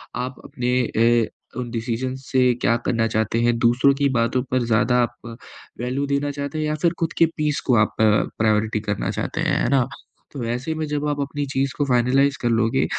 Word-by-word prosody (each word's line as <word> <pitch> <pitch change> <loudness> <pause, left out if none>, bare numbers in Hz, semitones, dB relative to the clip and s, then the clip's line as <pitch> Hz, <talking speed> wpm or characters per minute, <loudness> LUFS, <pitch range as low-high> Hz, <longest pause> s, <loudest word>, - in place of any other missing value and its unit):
आप 125 +2 -3
अपने 125 -4 -3
अ, 115 +2 0
उन 125 -1 -4
डिसिज़न्स 125 +3 -3
से 125 -2 +4
क्या 115 - +3
करना 115 -1 +1
चाहते 110 +1 0
हैं, 120 0 +2
दूसरों 120 +4 +4
की 140 0 +1
बातों 115 +2 +1
पर 130 - +2
ज़्यादा 115 +2 +2
आप 120 -1 -6 0.5
वैल्यू 130 +3 -1
देना 140 +1 0
चाहते 140 +2 -5
हैं 155 - -1
या 150 0 -1
फिर 170 -1 +3
खुद 165 - -1
के 165 - +6
पीस 150 -1 0
को 125 - +5
आप - - -11
अ, - - +6 0.3
प्रायॉरिटी 110 0 +1
करना 105 - -1
चाहते - - -3
हैं, - - +1
है - - +1
ना। 135 -3 +2 0.5
तो 135 -4 -5
ऐसे 125 +7 -2
में 155 0 -2
जब 150 0 -2
आप 145 0 -2
अपनी 145 +1 -3
चीज़ 135 0 0
को 145 - +1
फ़ाइनलाइज़ 135 +2 +2
कर 120 - +1
लोगे 110 - +2
125 Hz, 210 wpm, -22 LUFS, 115-140 Hz, 0.5 s, के